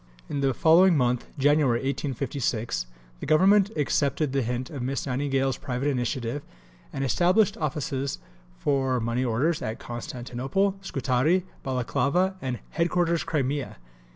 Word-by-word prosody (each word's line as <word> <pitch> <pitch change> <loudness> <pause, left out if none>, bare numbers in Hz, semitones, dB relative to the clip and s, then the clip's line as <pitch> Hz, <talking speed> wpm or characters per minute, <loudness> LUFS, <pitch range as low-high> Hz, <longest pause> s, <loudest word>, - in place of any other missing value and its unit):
In 140 - -3
the 135 -2 +1
following 170 +3 +5
month 125 -2 +1
(January 145 -3 +3
1856) 130 - -2 0.3
the - - -6
Government 190 +6 +5
accepted 145 -1 0
the 135 - +2
hint 125 +1 -3
of 140 -4 -5
Miss 135 +2 -2
Nightingale's 135 0 0
private 125 +2 -2
initiative 125 0 -2 0.5
and 135 - -3
established 180 - +3
offices 140 -3 -2 0.4
for 135 - +1
money 120 +2 -1
orders 130 +7 +1
at 110 +1 -3
Constantinople, 130 +9 -2
Scutari, 150 +2 +1 0.2
Balaclava, 140 +8 0
and 130 -2 -2
"Headquarters, 170 0 +1
Crimea." 140 -2 -2
135 Hz, 125 wpm, -26 LUFS, 125-155 Hz, 0.5 s, following